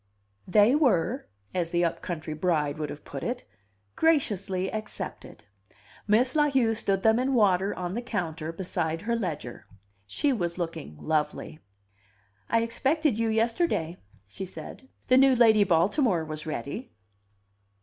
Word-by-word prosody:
They 210 +5 +5
were, 255 - +2 0.3
as 175 -2 -1
the 175 0 +2
up 165 - -2
country 155 -3 -4
bride 155 -3 0
would 150 -2 -3
have 145 - -9
put 135 - -6
it, 245 +1 -3 0.5
"graciously 200 - +1
accepted." 215 - -6 0.6
Miss 245 +6 +3
La 295 -1 +4
Heu 250 -5 +2
stood 195 -3 -1
them 220 +1 +4
in 260 +1 +1
water 195 -3 +3
on 180 0 -4
the 235 - -2
counter 165 -9 -3
beside 165 -2 -2
her 235 +2 0
ledger. 150 - -5 0.4
She 280 - +1
was 175 -7 -2
looking 165 - -5
lovely. 155 - -2 0.9
"I 230 0 +3
expected 270 +2 0
you 230 -1 +1
yesterday," 225 - 0 0.3
she 100 - -7
said. 265 +7 -10 0.2
"The 255 - +4
new 270 0 +6
Lady 220 -3 +6
Baltimore 185 - +2
was 155 0 -7
ready." 155 - -5
195 Hz, 140 wpm, -27 LUFS, 165-235 Hz, 0.9 s, new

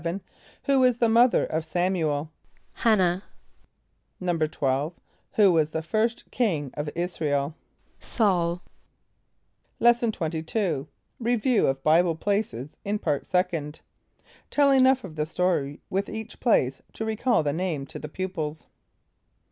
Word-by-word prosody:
= - - -28
Who 275 -1 +3
was 250 -2 +4
the 235 - +3
mother 235 +2 +4
of 160 +1 -2
S[)a]m´u 175 0 0
el? 145 +2 -3 0.5
=H[)a]n´nah.= 185 -5 +3 1.0
=12.= 155 -4 0 0.4
Who 200 -4 +5
was 155 -2 +3
the 160 0 -3
first 220 +7 -1
king 160 - 0
of 150 0 -4
[)I][s+]´ra 170 -3 -2
el? 145 +2 0 0.4
=S[a:]ul.= 175 -5 0 1.2
Lesson 240 -1 +4
XXII. 160 -2 -2 0.3
Review 240 0 +2
of 135 0 -1
Bible 165 +2 +4
Places 165 - -2
in 205 +1 -1
Part 145 -8 -2
Second. 170 -5 -1 0.7
(Tell 285 -1 +4
enough 265 -1 +5
of 160 -5 -9
the 150 0 -1
story 165 -5 -1
with 195 +1 -1
each 220 +1 -7
place 135 - +2
to 220 - -4
recall 220 -3 +1
the 145 -1 0
name 165 -5 -2
to - - -9
the 150 - -7
pupils.) 160 -4 -4
175 Hz, 130 wpm, -26 LUFS, 155-220 Hz, 1.2 s, Who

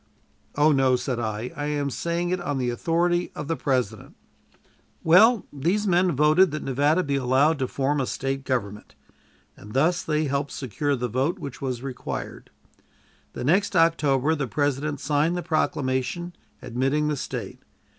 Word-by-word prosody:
"Oh, 150 +2 +4
no," 135 -2 +3
said 125 0 -2
I; 110 +1 -3
"I 145 - -3
am 145 -1 -1
saying 170 +4 -2
it 185 -1 -1
on 145 -5 -2
the 125 -2 0
authority 175 +7 0
of 150 - -5
the 165 - 0
President." 125 -8 -2 0.9
Well, 210 +6 +6
these 175 +9 0
men 180 -1 +3
voted 155 +6 +5
that 155 +1 -5
Nevada 145 +6 +2
be 140 -3 -1
allowed 135 +4 +2
to 130 - 0
form 140 +2 0
a 130 - -2
State 135 0 -3
government, 105 -6 -3 0.6
and 105 +1 -12
thus 160 +6 +2
they 155 0 0
helped 140 0 -2
secure 140 +3 -2
the 125 -1 -2
vote 135 - -1
which 140 -7 -8
was 130 -2 -3
required. 130 -2 -6 0.8
The - - -5
next 190 +9 +2
October 155 -4 +3
the 145 -4 -2
President 145 +2 -1
signed 150 +5 +1
the 175 - -3
proclamation 155 +1 -1 0.3
admitting 135 +5 0
the 150 - 0
State. 135 - -6
145 Hz, 160 wpm, -25 LUFS, 130-165 Hz, 0.9 s, Well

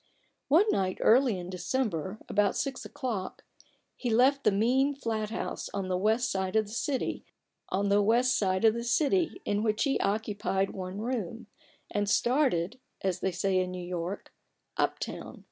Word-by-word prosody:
One 325 +9 +5
night 185 -1 0
early 245 -3 +4
in 180 0 -6
December, 185 - -2
about 205 -1 +2
six 270 -2 -3
o'clock, 230 -9 -4 0.5
he 245 - -3
left 260 +5 +4
the - - +4
mean 255 +8 +2
flat 220 -5 -2
house 225 - -4
on 195 -2 -2
the 180 - +1
west 220 +6 +1
side 190 +1 -2
of 220 -1 +3
the 205 - -11
city 265 +2 -2 2.2
in 205 0 0
which 215 -1 +1
he 275 -2 +1
occupied 200 -2 0
one 190 +1 -5
room, 230 -1 -3 0.5
and 205 -1 0
started 240 - +2 0.2
(as 185 -2 0
they 190 - 0
say 185 +1 +1
in 185 0 0
New 180 -1 -6
York) 175 +2 -5 0.2
" - - -51
up - - +1
town." - - -6
210 Hz, 145 wpm, -29 LUFS, 185-245 Hz, 2.2 s, One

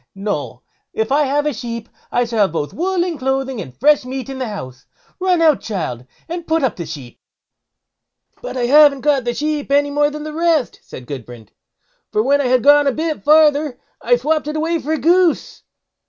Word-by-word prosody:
No! 155 - -4 0.3
if 220 +3 -2
I 295 +1 +3
have 290 +2 0
a 300 - 0
sheep, 235 -1 -6 0.2
I 245 - +1
shall 230 -1 -3
have 200 -5 +3
both 150 -2 -3
wool 365 +1 0
and 335 -5 -4
clothing, 265 -2 -2
and 130 -7 -11
fresh 295 +1 +4
meat 260 +1 -6
in 265 -1 -6
the 255 - -2
house. 130 - -8 0.3
Run 365 -2 +2
out, 310 -3 +4
child, 145 - -5 0.2
and 340 0 -6
put 320 -1 +1
up 260 - 0
the 170 -3 -6
sheep." 140 -6 -9 1.2
"But - - -6
I 245 - 0
haven't 285 +1 +5
got 280 -4 +1
the 240 0 -1
sheep 300 -1 -2
any 285 0 +3
more 290 0 +2
than 300 0 -7
the 305 0 -6
rest", 325 -4 0
said 125 - -11
Gudbrand; 120 -5 -9 0.6
"for 215 - +1
when 285 +3 +2
I 265 - 0
had 250 -1 +2
gone 290 +1 +6
a - - +3
bit 315 +2 -3
farther, 300 -2 +4 0.2
I 245 +1 +3
swopped 300 +5 -1
it 300 - -3
away 330 +2 0
for 310 +1 -3
a - - 0
goose." 345 +2 +1
275 Hz, 205 wpm, -18 LUFS, 225-305 Hz, 1.2 s, gone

